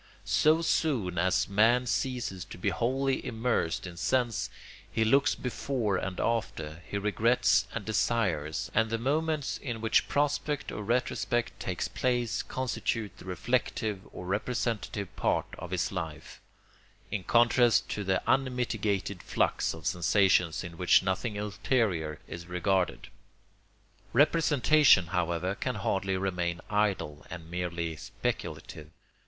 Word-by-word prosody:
So 155 +2 +3
soon 115 - +1
as 95 +1 +2
man 115 +5 +4
ceases 125 -7 -2
to - - -10
be 90 - 0
wholly 130 +3 0
immersed 115 -9 -1
in 90 -2 -8
sense, 120 +2 0 0.4
he 110 - +1
looks 140 +6 +4
before 125 -5 -1
and 95 -1 -4
after, 85 -9 -2
he 100 - -2
regrets 110 +2 +2
and 115 -4 -5
desires; 90 -8 0
and 110 0 +2
the 115 - 0
moments 150 +4 -1
in 120 -5 -4
which 110 0 +2
prospect 145 0 0
or - - -5
retrospect 120 -1 -1
takes 90 -1 -2
place 120 -2 0
constitute 115 -4 -3
the - - -13
reflective 110 0 -1
or 90 - -8
representative 105 0 -2
part - - +1
of 90 - -7
his 95 -1 -1
life, 80 -5 -6 0.7
in 100 - -2
contrast 120 +2 +4
to 105 - -3
the 95 -1 0
unmitigated 115 -7 0
flux - - 0
of 80 -2 -11
sensations 90 -1 +2
in 85 -1 -8
which 90 +1 +5
nothing 100 +3 -1
ulterior 100 - -1
is 85 +1 -8
regarded. 90 +1 0 1.0
Representation, 150 - +5
however, 90 +1 0
can 125 +4 -3
hardly 95 -1 -1
remain 90 -2 -1
idle 100 -8 0
and 85 -1 -9
merely 85 -2 -3
speculative. 90 -7 -5
105 Hz, 125 wpm, -29 LUFS, 90-120 Hz, 1.0 s, which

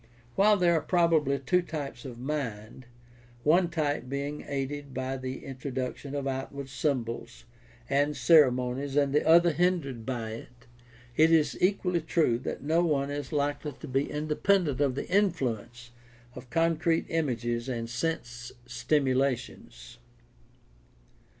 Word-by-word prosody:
While 205 - +4
there 175 -2 +3
are 160 - +2
probably 160 -6 +2
two 180 +7 +1
types 145 -7 -6
of 125 -3 -7
mind, 125 -4 -5 0.6
one 170 +3 +4
type 145 -6 -2
being 140 +2 -4
aided 140 0 -4
by 130 +1 -2
the 130 0 -6
introduction 135 +1 -5
of 140 -1 -2
outward 135 0 -4
symbols 125 -4 -3 0.4
and 145 +2 +1
ceremonies 135 -3 +3
and 140 -1 +2
the 150 - +3
other 170 +1 +6
hindered 160 -8 0
by 115 -2 -4
it, 120 +2 -11 0.5
it 160 +3 +5
is 160 -2 +3
equally 180 -2 +1
true 155 -7 +1
that 130 - -5
no 160 +4 +2
one 145 -4 0
is 145 +2 -5
likely 145 0 -1
to - - -10
be 135 +2 0
independent 150 0 +1
of 135 -3 +2
the - - -4
influence 125 - -1 0.4
of 125 - -11
con 165 +1 +2
crete 165 +1 +1
images 120 -6 -1
and 115 -2 -3
sense 120 -2 -4
stimulations. 125 - -1
140 Hz, 135 wpm, -28 LUFS, 125-160 Hz, 0.6 s, other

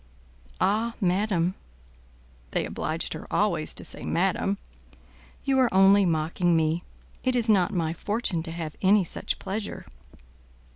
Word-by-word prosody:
"Ah, 220 +4 +1
madam" 185 -2 +1 1.0
(they - - +1
obliged - - -3
her - - -8
always - - +1
to - - -5
say - - -4
madam), 95 +4 0 0.9
"you 270 -1 +2
are 255 -2 +3
only 195 +1 +6
mocking 165 +2 +1
me; 160 +2 +1 0.4
it 255 -1 +1
is 240 -2 +1
not 200 -3 +4
my 165 -5 -1
fortune 205 -1 -1
to 165 0 -5
have 165 -2 -5
any 200 +1 +5
such 170 - -3
pleasure." 205 +2 -5
190 Hz, 135 wpm, -26 LUFS, 165-210 Hz, 1.0 s, only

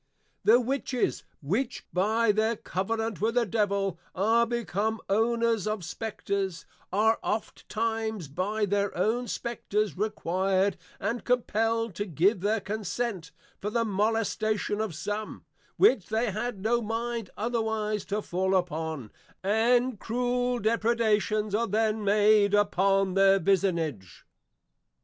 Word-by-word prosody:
The 230 +3 +6
Witches 255 0 -1 0.2
which 225 - -2
by 215 +4 +3
their 220 +2 +1
covenant 225 +2 -3
with 225 +2 +1
the 245 -1 +3
Devil, 200 -3 0 0.2
are 225 +5 +3
become 220 -1 -1
Owners 230 0 +1
of 215 -5 -2
Spectres, 195 -3 -3 0.3
are 220 +3 +3
oftentimes 220 -3 -2
by 200 +9 -1
their 200 -1 -1
own 230 +6 +1
Spectres 215 -3 -2
required 195 -1 0 0.2
and 235 +3 -2
compelled 225 -2 0
to 205 +4 -3
give 185 +3 +2
their 215 +3 +1
consent, 205 -2 -3 0.3
for 210 - -3
the 230 +2 0
molestation 215 0 0
of 210 -7 -3
some, 210 +7 -5 0.3
which 265 - +4
they 220 +1 0
had 215 +1 -3
no 235 +2 +2
mind 230 -1 -3
otherwise 220 -2 -1
to 205 +1 -2
fall 190 +2 0
upon; 160 - -2 0.3
and 235 +3 +2
cruel 245 +1 0
depredations 220 -2 +1
are 230 +2 +1
then 215 +1 0
made 205 0 +4
upon 195 -1 +2
the 195 0 +5
Vicinage. 165 - -1
215 Hz, 120 wpm, -28 LUFS, 195-230 Hz, 0.3 s, The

